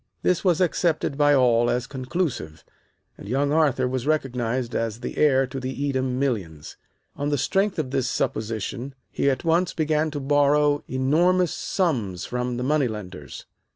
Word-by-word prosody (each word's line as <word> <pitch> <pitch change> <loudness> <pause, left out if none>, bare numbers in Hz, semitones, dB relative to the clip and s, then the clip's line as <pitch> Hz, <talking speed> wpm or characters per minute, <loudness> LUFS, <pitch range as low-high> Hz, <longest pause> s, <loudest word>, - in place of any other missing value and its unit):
This 180 - +1
was 180 -2 +2
accepted 170 -4 +1
by 145 0 +4
all 120 -2 +4
as 125 0 0
conclusive, 130 - -4 0.5
and 100 - -9
young 140 +3 +1
Arthur 145 -5 +2
was 130 +1 -3
recognized 125 -5 -1
as 115 0 -2
the - - -5
heir 135 -3 +4
to 130 +1 -6
the 130 +1 -5
Edam 130 -2 -1
millions. 95 - -3 0.4
On 145 0 -2
the 145 - +1
strength 195 +9 0
of 145 -5 -2
this 135 -2 0
supposition 115 +4 -3 0.2
he 140 - +1
at 130 -2 -1
once 170 +2 +2
began 155 0 +1
to 145 -1 -4
borrow 145 +1 +3
enormous 170 +7 +2
sums 115 - -1
from 125 0 -3
the 125 - -3
money 145 0 +2
lenders. 90 - -8
135 Hz, 160 wpm, -24 LUFS, 125-150 Hz, 0.5 s, by